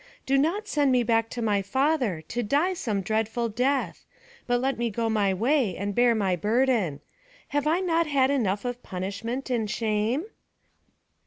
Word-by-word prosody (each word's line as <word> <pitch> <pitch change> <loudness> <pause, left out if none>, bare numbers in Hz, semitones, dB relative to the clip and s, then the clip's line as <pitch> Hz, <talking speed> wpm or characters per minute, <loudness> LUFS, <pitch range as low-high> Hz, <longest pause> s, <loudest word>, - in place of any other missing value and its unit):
Do 270 - +2
not 340 +10 +1
send 290 -7 +2
me 250 -1 +3
back 225 -1 +1
to 240 - -4
my 205 -2 +2
father, 250 - 0
to 240 - -2
die 290 - +1
some 220 - -2
dreadful 220 +3 -1
death; 260 +5 -1 0.4
but 245 0 +2
let 265 0 -1
me 235 -1 0
go 225 +1 -1
my 205 -3 +2
way, 230 - +1
and 200 +1 -3
bear 240 +2 +4
my 195 -4 +1
burden. 210 - +1 0.5
Have 290 +1 0
I 335 +4 +2
not 335 -3 +1
had 275 -2 +2
enough 210 -6 0
of 245 0 -4
punishment 200 +9 -4
and 225 -4 0
shame?" 220 +5 0
235 Hz, 170 wpm, -26 LUFS, 210-275 Hz, 0.5 s, bear